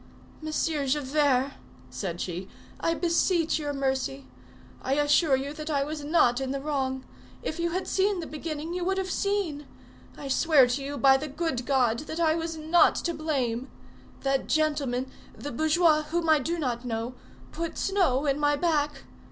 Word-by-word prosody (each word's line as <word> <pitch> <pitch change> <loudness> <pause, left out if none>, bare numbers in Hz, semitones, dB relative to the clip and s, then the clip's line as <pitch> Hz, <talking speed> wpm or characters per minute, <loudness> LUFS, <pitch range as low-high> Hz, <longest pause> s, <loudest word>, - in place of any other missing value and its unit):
"Monsieur 310 -2 -1
Javert," 275 -1 +2 0.4
said 170 +7 -4
she, 180 +1 -4 0.3
"I 330 - +1
beseech 335 -1 +1
your 295 -1 -2
mercy. 270 -1 -2 0.6
I 265 - -1
assure 290 +1 +4
you 275 +2 -3
that 305 0 -6
I 280 -2 +1
was 300 +1 -5
not 280 -5 +3
in 265 - -2
the 275 +1 -2
wrong. 265 -2 -2 0.4
If 315 - -4
you 340 0 +1
had 370 +3 -3
seen 390 0 +1
the 335 - -4
beginning, 310 +1 -5
you 360 0 -2
would 385 +2 0
have 380 -1 -2
seen. 380 -9 -1 0.5
I 280 - -7
swear 280 0 +5
to 250 +3 -2
you 285 +1 -4
by 270 +1 +6
the 305 +3 -5
good 280 -4 -3
God 245 -4 +2
that 320 - -4
I 320 -2 +3
was 330 0 -3
not 315 +3 +4
to 340 - -2
blame! 270 -6 -2 0.5
That 270 -1 0
gentleman, 280 -5 0 0.3
the 290 - -6
bourgeois, 315 +3 +3
whom 330 +2 -2
I 310 -1 +6
do 335 +6 -2
not 250 -6 -2
know, 230 0 -3 0.4
put 335 0 -4
snow 350 -9 +1
in 280 0 +1
my 290 0 +3
back. 295 -3 0
295 Hz, 175 wpm, -27 LUFS, 265-325 Hz, 0.6 s, by